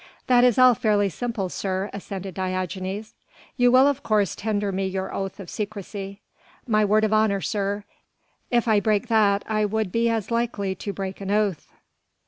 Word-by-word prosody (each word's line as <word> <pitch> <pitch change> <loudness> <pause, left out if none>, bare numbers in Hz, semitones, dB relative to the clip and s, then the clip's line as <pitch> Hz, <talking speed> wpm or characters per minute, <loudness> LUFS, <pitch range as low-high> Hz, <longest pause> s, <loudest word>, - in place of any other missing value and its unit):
"That 245 -1 +5
is 250 -3 +4
all 255 -1 +7
fairly 210 -3 +1
simple, 225 +1 -3
sir," 190 +2 -3
assented 195 -1 -6
Diogenes. 185 +3 -4 0.4
"You 245 -2 +4
will 260 +2 +6
of 285 -1 +1
course 210 -5 +1
tender 205 -1 -1
me 190 0 -1
your 190 0 -4
oath 195 +1 -4
of 195 - -8
secrecy." 200 0 -6 0.4
"My 215 -3 +2
word 210 +1 +3
of 215 0 +2
honour, 215 -2 +2
sir. 205 0 -2 0.7
If 240 -1 +1
I 215 -2 +4
break 215 +3 0
that 205 -3 +3
I 215 -1 0
would 210 -2 -1
be 230 +2 +2
as 225 -1 -2
likely 230 -5 -1
to 200 +2 -5
break 195 0 -6
an 195 - -5
oath." 205 -5 0
205 Hz, 175 wpm, -24 LUFS, 195-220 Hz, 0.7 s, all